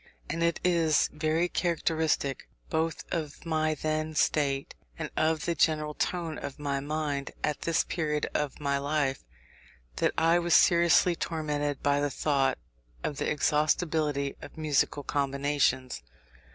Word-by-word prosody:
And 165 - -3
it 170 0 +1
is 165 -4 +3
very 155 +3 +1
characteristic 160 -5 0 0.2
both 160 0 -1
of 155 -1 -4
my 155 -1 +1
then 155 +1 -2
state, 140 -3 +1 0.2
and - - -5
of 155 0 +1
the 170 - +1
general 150 -1 +1
tone 165 -1 -2
of 140 - -6
my 140 -2 -2
mind 145 -1 -2
at 150 -1 -1
this 165 -1 +2
period 150 -3 -1
of 150 -2 -2
my 140 -1 0
life, 140 -1 -1 0.7
that - - +1
I 165 +2 +4
was 175 0 +2
seriously 170 0 +5
tormented 150 -4 -2
by 145 0 +3
the 145 0 0
thought 135 -1 +1 0.5
of 145 - -3
the - - -1
exhaustibility 150 -1 +1
of - - -11
musical 145 -2 +1
combinations. 140 - 0
150 Hz, 140 wpm, -29 LUFS, 145-160 Hz, 0.7 s, seriously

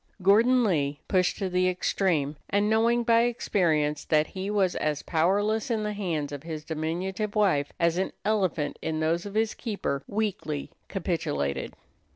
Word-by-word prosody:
Gordon 235 +6 +5
Lee, 145 -8 0
pushed 185 -2 +2
to 195 - -2
the 185 0 +2
extreme, 175 -5 0
and 205 +1 +2
knowing 230 +2 +3
by 230 0 +4
experience 160 -11 +1
that 155 -1 +3
he 190 +4 -5
was 195 -3 +1
as 150 -1 -1
powerless 205 +9 +1
in 220 -2 0
the 210 0 -2
hands 165 -8 -2
of 145 -1 -6
his 155 -1 -6
diminutive 180 +7 -3
wife 180 -9 +2
as 170 +1 +2
an 190 - -1
elephant 185 -8 0
in 160 -1 -2
those 165 +4 0
of 200 - -9
his 220 0 +1
keeper, 200 - -3
weakly 200 -9 -2 0.2
capitulated. 70 - -2
185 Hz, 160 wpm, -27 LUFS, 155-210 Hz, 0.2 s, Gordon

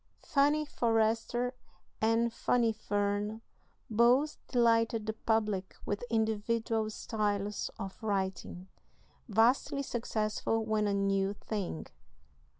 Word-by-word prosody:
"Fanny 295 +2 +2
Forrester" 230 0 +1 0.5
and 225 +1 +2
"Fanny 235 -1 +2
Fern" 205 +1 -1 0.4
both 240 +7 +3
delighted 230 -2 +2
the 220 - -2
public 215 -4 -1
with 205 +3 -2
individual 220 0 0
styles 210 -2 -2
of 195 -1 -7
writing, 190 -3 -2 0.6
vastly 240 +6 +3
successful 225 -2 -1
when 215 -1 +1
a 200 - +1
new 195 0 +1
thing. 195 - -4
220 Hz, 95 wpm, -31 LUFS, 205-230 Hz, 0.6 s, both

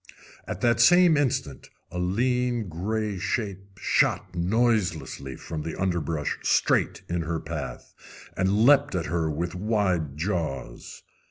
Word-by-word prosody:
At - - -5
that 120 -1 +3
same 175 +3 +6
instant 125 - -1 0.2
a 90 - -4
lean, 120 +4 0
gray 105 +4 -2
shape 100 -1 -3
shot - - +1
noiselessly 90 - 0
from 80 -1 -6
the 80 +3 -6
underbrush 85 -5 -1
straight - - +1
in 85 0 -1
her 80 0 -2
path, 75 -6 -6 0.4
and 100 +4 +2
leaped 140 -3 +5
at 85 -3 -1
her 85 -2 -1
with 85 +3 -3
wide 90 -7 0
jaws. 80 -8 -4
90 Hz, 125 wpm, -26 LUFS, 80-110 Hz, 0.4 s, same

